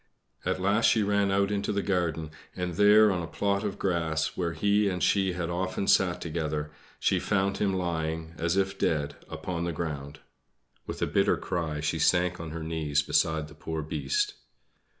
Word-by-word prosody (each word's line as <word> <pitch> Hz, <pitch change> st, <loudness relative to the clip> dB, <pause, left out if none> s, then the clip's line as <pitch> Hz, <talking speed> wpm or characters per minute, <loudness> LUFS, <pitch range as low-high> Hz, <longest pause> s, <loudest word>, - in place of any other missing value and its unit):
At -, -, -1 dB
last 100 Hz, +4 st, +2 dB
she 110 Hz, -, +3 dB
ran 100 Hz, 0 st, +2 dB
out 100 Hz, +1 st, +2 dB
into 100 Hz, 0 st, -1 dB
the 100 Hz, -1 st, -1 dB
garden; 85 Hz, -5 st, -1 dB, 0.2 s
and 90 Hz, -1 st, -3 dB
there, 105 Hz, +3 st, +6 dB
on 90 Hz, -2 st, -1 dB
a 85 Hz, -, -5 dB
plot 100 Hz, +3 st, 0 dB
of 105 Hz, -2 st, -3 dB
grass, 80 Hz, -4 st, -1 dB
where 85 Hz, -2 st, -1 dB
he 100 Hz, +4 st, +2 dB
and 90 Hz, -2 st, -2 dB
she 95 Hz, -2 st, +2 dB
had 90 Hz, -1 st, -3 dB
often 95 Hz, +2 st, -2 dB
sat 90 Hz, -2 st, +3 dB
together, 75 Hz, -2 st, -3 dB, 0.3 s
she -, -, +2 dB
found 100 Hz, -1 st, 0 dB
him 100 Hz, -2 st, +2 dB
lying 80 Hz, -3 st, -2 dB
as 85 Hz, +3 st, 0 dB
if 95 Hz, 0 st, 0 dB
dead 75 Hz, -2 st, 0 dB, 0.2 s
upon 85 Hz, -2 st, -4 dB
the 85 Hz, -, -1 dB
ground. 75 Hz, -2 st, -5 dB, 0.7 s
With -, -, -3 dB
a -, -, +4 dB
bitter -, -, +2 dB
cry 80 Hz, -4 st, -3 dB
she 75 Hz, +2 st, -1 dB
sank 90 Hz, +2 st, +2 dB
on 85 Hz, -1 st, -5 dB
her 80 Hz, +1 st, -5 dB
knees 75 Hz, -3 st, 0 dB
beside 80 Hz, +1 st, +1 dB
the 80 Hz, -, -13 dB
poor 80 Hz, 0 st, -4 dB
Beast. 415 Hz, -, -1 dB
85 Hz, 185 wpm, -28 LUFS, 80-100 Hz, 0.7 s, there